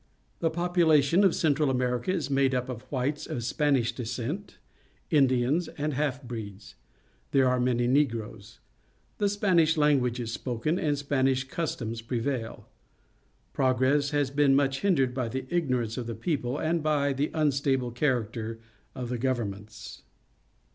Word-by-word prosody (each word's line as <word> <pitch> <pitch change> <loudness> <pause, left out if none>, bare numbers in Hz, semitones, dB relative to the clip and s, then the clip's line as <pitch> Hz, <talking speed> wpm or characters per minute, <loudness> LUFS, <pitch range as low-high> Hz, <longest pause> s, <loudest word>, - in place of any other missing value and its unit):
The 165 - +1
population 170 -1 +3
of 190 -4 +4
Central 150 -2 +2
.America 125 +3 0
is 155 -7 -2
made 135 -1 +2
up 125 0 -2
of 120 -3 -5
whites 140 +2 -2
of 120 - -4
Spanish 130 -1 +1
descent, 125 - -5 0.5
Indians, 135 +2 +3
and 150 0 -1
half 140 -1 -1
breeds. 110 -4 -8 0.6
There 135 -2 +3
are 125 0 +2
many 125 -1 +1
Negroes. 115 -5 -1 0.6
The 205 - +2
Spanish 180 -6 +2
language 135 -5 +2
is 115 -2 -4
spoken, 130 +10 -2
and 145 -2 0
Spanish 135 -2 +1
customs 130 -6 -4
prevail. 115 0 -3 0.9
Progress 130 +2 +2
has 145 -2 0
been 140 -1 +4
much 135 -1 +2
hindered 135 -11 +2
by 125 -3 -2
the 130 +3 -4
ignorance 125 -9 0
of 120 -2 -4
the 115 - -4
people 140 -6 -2
and 165 +2 0
by 145 -2 +1
the 140 +3 -1
unstable 135 -4 +1
character 115 -3 -1 0.4
of 125 -2 -5
the 125 -1 -3
governments. 110 -4 -4
135 Hz, 140 wpm, -28 LUFS, 120-150 Hz, 0.9 s, of